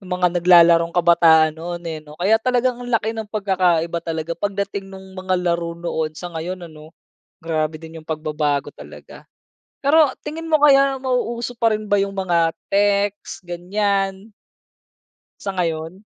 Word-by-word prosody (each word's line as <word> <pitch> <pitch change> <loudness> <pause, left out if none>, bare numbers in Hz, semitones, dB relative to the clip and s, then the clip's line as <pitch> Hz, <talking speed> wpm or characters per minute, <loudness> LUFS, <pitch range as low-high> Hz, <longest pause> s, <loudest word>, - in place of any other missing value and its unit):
mga 180 -1 +1
naglalarong 170 -1 +5
kabataan 165 -2 +5
noon, 175 +1 -6
eh, 160 -1 -4
'no? 150 0 -14
Kaya 210 +5 +3
talagang 250 +1 0
ang 245 - -8
laki 225 -1 +1
ng 220 -1 -5
pagkakaiba 180 -5 0
talaga, 165 -1 -4
pagdating 200 -1 -3
nung 190 0 -11
mga 185 0 -1
laro 170 -1 -1
noon 160 -2 -3
sa 175 +2 -7
ngayon, 175 +3 -5
ano? 155 0 -13 0.5
Grabe 155 -1 -1
din 160 0 -10
yung 155 - -19
pagbabago 150 -2 -2
talaga. - - -13 0.6
Pero 295 +1 +5 0.2
tingin 325 +2 -5
mo, 310 - +4
kaya 275 -2 +5
mauuso 245 -2 -2
pa 230 -1 +3
rin 215 0 -5
ba - - +4
yung 200 0 -3
mga 175 -4 +1 0.2
text, 200 0 0
ganyan? 195 +3 -2 1.1
Sa 195 -1 -4
ngayon? 165 +2 -3
180 Hz, 150 wpm, -20 LUFS, 165-205 Hz, 1.1 s, naglalarong